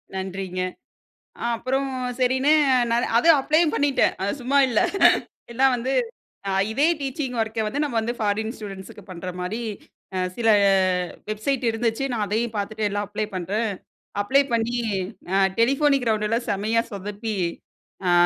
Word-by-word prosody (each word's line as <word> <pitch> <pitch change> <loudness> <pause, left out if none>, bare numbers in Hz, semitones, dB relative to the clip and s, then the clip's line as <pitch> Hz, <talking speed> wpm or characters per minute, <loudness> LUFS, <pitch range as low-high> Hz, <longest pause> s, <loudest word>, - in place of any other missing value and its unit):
நன்றிங்க. 190 -1 -4 0.8
அ - - -6
அப்புறம் 265 +4 -1 0.3
சரின்னு 260 +3 +2 0.4
நானு 235 +1 +2
அதும் 320 +3 +6
அப்ளயும் 310 +3 +2
பண்ணிட்டேன். 285 -2 +2
அது 200 - 0
சும்மா 275 +3 +2
இல்ல. 235 -4 +2 0.7
எல்லாம் 265 +1 +4
வந்து, 245 +2 -2 0.6
அ - - 0 0.2
இதே 285 +7 +3
டீச்சிங் 270 -2 -3
ஒர்க்க 220 -1 -2
வந்து 285 +7 -1
நம்ம 270 -6 -1
வந்து 235 +2 -2
ஃபாரின் 220 +2 -1
ஸ்டூடெண்ட்ஸுக்கு 195 -1 -9
பண்ற 185 +1 -6
மாரி, 215 +6 -3 0.5
அ - - 0 0.2
சில 225 -2 +2 0.8
வெப்சைட் 235 +4 -1
இருந்துச்சு 225 +3 -1
நான் 215 -3 0
அதையும் 225 +1 -1
பாத்துட்டு 210 +1 -1
எல்லாம் 205 0 -2
அப்ளை 215 +1 -2
பண்ணுறேன், 205 +5 -1 0.5
அப்ளை 275 +6 +4
பண்ணி 230 +1 0 0.6
அ - - +4 0.2
டெலிபோனிக் 275 +1 +3
ரவுண்டுல 215 +1 0
செம்மையா 220 +3 +1
சொதப்பி 205 +2 -4 0.7
அ - - +4
225 Hz, 140 wpm, -24 LUFS, 210-260 Hz, 0.8 s, அதும்